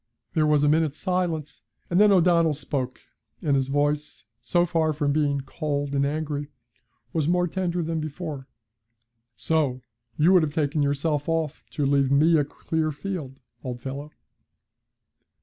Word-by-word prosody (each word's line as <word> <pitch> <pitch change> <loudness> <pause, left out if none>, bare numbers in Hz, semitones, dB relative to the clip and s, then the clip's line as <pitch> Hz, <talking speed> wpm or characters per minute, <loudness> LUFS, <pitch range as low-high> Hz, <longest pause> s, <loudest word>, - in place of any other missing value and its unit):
There 155 -2 +2
was 150 -1 +3
a - - +4
minute's 155 -1 +2
silence, 175 -5 -2 0.3
and 175 - +2
then 210 -1 +6
O'Donnell 170 -4 +4
spoke, 135 -3 -4 0.4
and 145 -2 +2
his 135 -1 +1
voice, 145 -4 -1 0.2
so 175 +8 +2
far 160 -2 +1
from 145 -1 0
being 145 -2 +1
cold 145 0 -3
and 140 0 +2
angry, 145 -1 -3 0.7
was 155 -3 0
more 180 +1 +2
tender 180 -1 -1
than 165 0 -2
before. 155 -3 -5 0.9
'So 140 -5 0 0.3
you 165 +5 +5
would 180 - +7
have 150 -2 -2
taken 150 0 +1
yourself 145 +1 0
off 160 -3 -1
to 145 - 0
leave 140 -1 +3
me 155 +4 +4
a 150 - +4
clear 155 +2 -2
field, 150 -5 -6 0.2
old 125 -2 -5
fellow!' 140 +4 -6
150 Hz, 150 wpm, -25 LUFS, 140-165 Hz, 0.9 s, would